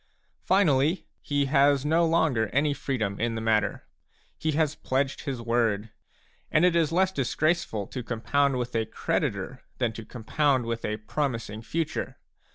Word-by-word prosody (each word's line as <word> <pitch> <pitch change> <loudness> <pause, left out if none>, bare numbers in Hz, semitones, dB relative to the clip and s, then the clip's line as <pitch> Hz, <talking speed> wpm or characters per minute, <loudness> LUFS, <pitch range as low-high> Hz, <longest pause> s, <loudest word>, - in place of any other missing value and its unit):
Finally, 165 -3 +2 0.2
he 145 -1 0
has 140 0 +3
no 165 +3 +3
longer 155 -9 +2
any 145 +6 +1
freedom 110 -9 -2
in 115 0 0
the - - -2
matter; 110 -1 0 0.5
he 155 -1 -1
has 155 -1 +1
pledged 135 0 -2
his 135 -4 -3
word. 115 -2 0 0.6
And 155 +3 +4
it 180 -2 +3
is 165 -2 +2
less 185 +2 +3
disgraceful 150 - 0
to 125 - -6
compound 130 +4 0
with 125 -1 -3
a 110 -1 0
creditor - - -2 0.2
than 120 -3 0
to 115 - -7
compound 130 +4 0
with 115 0 -3
a 105 0 -2
promising 115 -2 -3
future. 160 +8 -3
135 Hz, 155 wpm, -27 LUFS, 115-155 Hz, 0.6 s, And